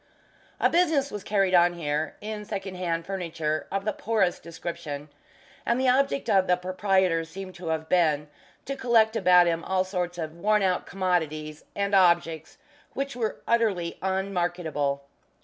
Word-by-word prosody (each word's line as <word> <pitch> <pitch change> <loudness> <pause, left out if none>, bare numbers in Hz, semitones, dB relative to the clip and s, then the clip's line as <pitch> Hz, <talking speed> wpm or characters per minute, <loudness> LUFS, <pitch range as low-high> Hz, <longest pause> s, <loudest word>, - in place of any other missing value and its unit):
A - - +4
business 320 -6 +2
was 210 -2 -6
carried 195 -3 +1
on 175 0 +5
here 150 -2 -2
in 210 0 -5
second 195 -2 -5
hand 170 -2 -2
furniture 165 -5 -3
of 195 0 -2
the 215 - 0
poorest 210 -5 0
description, 165 -3 -6 0.5
and 235 +2 +1
the 260 -1 +3
object 275 +2 +2
of 190 -1 +3
the 180 - +3
proprietor 185 -2 +1
seemed 185 +3 -8
to 175 -1 -8
have 160 0 -2
been 155 -5 +2 0.4
to 275 - -3
collect 230 -4 +3
about 180 -4 +6
him 170 -1 0
all 190 -1 +1
sorts 180 -2 -3
of 160 -1 -5
worn 210 +4 +2
out 185 -2 0
commodities, 160 -5 -2
and 200 0 -1
objects 170 -4 +2 0.4
which 275 -1 -3
were 225 -3 -3
utterly 205 -8 +1
unmarketable. 175 -7 -1
180 Hz, 155 wpm, -26 LUFS, 165-200 Hz, 0.5 s, about